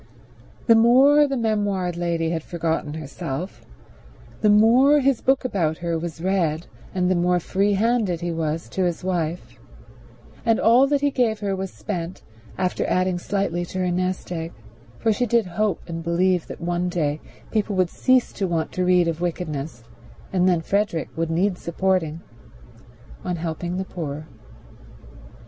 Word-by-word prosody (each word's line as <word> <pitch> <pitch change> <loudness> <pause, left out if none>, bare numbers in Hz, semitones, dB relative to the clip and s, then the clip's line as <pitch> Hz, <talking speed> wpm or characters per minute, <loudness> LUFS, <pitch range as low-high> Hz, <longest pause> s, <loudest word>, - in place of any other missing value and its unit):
The 230 - +7
more 265 +6 +6
the 275 - -2
memoired 205 -6 0
lady 170 -1 -1
had 165 -1 -1
forgotten 160 -2 -2
herself, 155 +3 -6 0.8
the 210 - +4
more 240 +8 +6
his 275 -3 +2
book 265 0 +2
about 165 -10 0
her 170 -1 -2
was 165 -1 -4
read 175 -4 0 0.3
and 180 -1 +1
the 185 - +3
more 175 +1 +2
free 195 +4 +1
handed 210 -4 +1
he 175 0 -2
was 160 0 -2
to 190 - 0
his 175 -1 -2
wife; 175 -2 -3 0.8
and 225 -2 +2
all 245 +4 +5
that 285 0 +1
he 285 0 +2
gave 225 -5 0
her 200 -1 -1
was 190 0 -4
spent, 175 -3 -5 0.3
after 185 -1 0
adding 185 -1 +1
slightly 190 -2 -1
to 185 - -7
her 180 -1 0
nest 185 +1 -2
egg—for 160 - -4
she 245 +4 0
did 230 -1 +2
hope 200 +3 -2
and 165 -1 -5
believe 175 +1 +1
that - - -7
some 175 +1 0
day 155 -4 -1 0.3
people 210 -2 0
would 185 -2 +1
cease 255 -1 +2
to 195 - -2
want 165 -2 -1
to 185 - -1
read 180 -1 +4
of 165 0 -2
wickedness, 155 -7 -4 0.5
and 185 0 +3
then 175 -2 +2
Frederick 200 -2 -1
would 165 0 -1
need 180 +3 +1
supporting—on 155 -6 -4
helping 170 +2 -3
the 190 - -2
poor. 155 -4 -5
180 Hz, 160 wpm, -23 LUFS, 165-205 Hz, 0.8 s, The